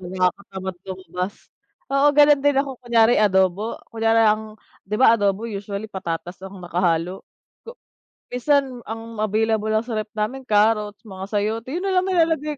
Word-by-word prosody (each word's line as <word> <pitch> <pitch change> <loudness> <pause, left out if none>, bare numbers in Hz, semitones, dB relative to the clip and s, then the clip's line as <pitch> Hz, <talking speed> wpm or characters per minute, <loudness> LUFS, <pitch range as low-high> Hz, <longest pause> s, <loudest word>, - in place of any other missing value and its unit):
nakakatamad 190 +1 -2
lumabas. 185 +1 -5 0.5
Oo, 275 +1 +3
gano'n 290 -1 +5
din 285 -1 +3
ako, 275 0 0
kunyari 235 -1 +4
adobo? 190 +1 +2
Kunyari 225 0 +2
ang 215 0 0 0.2
'di 205 - -5
ba, 230 -3 +6
adobo 205 +1 0
usually 200 0 -5
patatas 180 -3 -6
ang 195 0 -9
nakahalo? 175 0 -1 0.4
Ko 475 +2 -12 0.6
minsan 260 -1 +1
ang 225 -1 -6
available 220 0 +1
lang 220 +1 +1
sa 235 - -5
ref 215 - -11
namin, 220 +6 -2
carrots, 210 -2 +1
mga 190 -2 -7
sayote, 215 +3 -2
yun 365 - -3
nalang 375 -1 +1
nilalagay 320 -4 +1
215 Hz, 150 wpm, -22 LUFS, 195-250 Hz, 0.6 s, ba